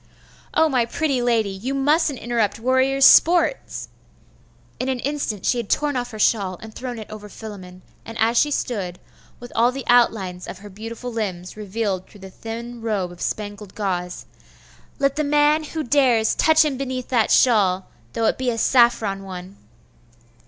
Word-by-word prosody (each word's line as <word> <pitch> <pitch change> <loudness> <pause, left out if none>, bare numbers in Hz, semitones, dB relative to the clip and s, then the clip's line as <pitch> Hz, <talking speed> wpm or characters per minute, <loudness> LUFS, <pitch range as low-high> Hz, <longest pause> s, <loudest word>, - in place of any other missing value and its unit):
'Oh, 320 0 +5
my 255 -5 +2
pretty 270 +2 -1
lady! 230 -4 +1
you 230 +8 -4
mustn't 295 +1 +2
interrupt 230 -4 -1
warriors' 260 +3 +3
sport!' 350 +8 +6 1.2
In 255 - -2
an 260 - 0
instant 280 -9 -3
she 245 - +2
had 230 - -5
torn 295 -1 +1
off 245 -1 -2
her 215 - -9
shawl, 200 -4 +1
and 220 0 -11
thrown 245 0 -6
it 220 - -8
over 210 -1 -9
Philammon; 185 -4 -10 0.2
and 225 0 -9
as 225 +2 +2
she 295 - +4
stood, 200 -11 -3 0.4
with 245 0 -10
all 235 +2 +4
the 270 +1 -6
outlines 210 -7 +2
of - - -7
her 205 +1 -12
beautiful 225 +4 -7
limbs 185 -5 -4
revealed 205 -2 -3
through 205 - -17
the 190 0 -10
thin 235 +3 -7
robe 205 -6 -2
of 175 - -13
spangled 205 -2 -5
gauze 180 -4 -3 0.7
'Let 275 0 0
the 305 - +1
man 295 +1 +3
who 315 +1 -4
dares, 245 -5 +3
touch 315 0 +4
him 285 -4 -1
beneath 260 -2 -4
that 235 -4 +2
shawl! 195 -7 +3 0.3
though 230 -1 -1
it - - +1
be 260 -1 0
a 230 - -2
saffron 225 -5 +3
one! 185 0 -9
230 Hz, 175 wpm, -22 LUFS, 205-260 Hz, 1.2 s, sport